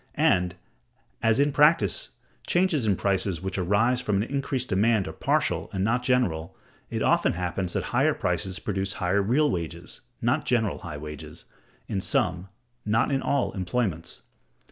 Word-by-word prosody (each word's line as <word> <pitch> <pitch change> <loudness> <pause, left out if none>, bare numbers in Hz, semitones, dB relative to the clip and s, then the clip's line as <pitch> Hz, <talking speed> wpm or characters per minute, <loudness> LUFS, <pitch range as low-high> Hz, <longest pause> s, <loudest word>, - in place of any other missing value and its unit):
And, 90 0 +2 0.7
as 115 +2 +3
in 145 +1 +3
practice, 145 - +3 0.3
changes 175 -9 +2
in 100 - +3
prices 95 -2 0
which 95 0 -3
arise 110 +7 +2
from 105 -5 0
an 100 - +2
increased 135 0 -2
demand 100 0 +2
are - - -6
partial, - - 0
and 95 -1 -1
not 115 +4 +1
general, 95 -10 0 0.3
it - - -2
often - - +3
happens 90 +1 -3
that - - -1
high - - +4
prices 95 -1 -2
produce 95 -2 -2
high 90 -1 -2
real 120 +10 +2
wages 85 -2 -5 0.2
(not - - +1
general 110 -4 0
high 80 -4 -7
wages) 75 -1 -9 0.4
in 100 -2 -2
some, 90 0 0 0.3
not 110 +5 +1
in 135 -1 +1
all 140 -2 0
employments. 95 -3 -2
100 Hz, 155 wpm, -26 LUFS, 90-125 Hz, 0.7 s, high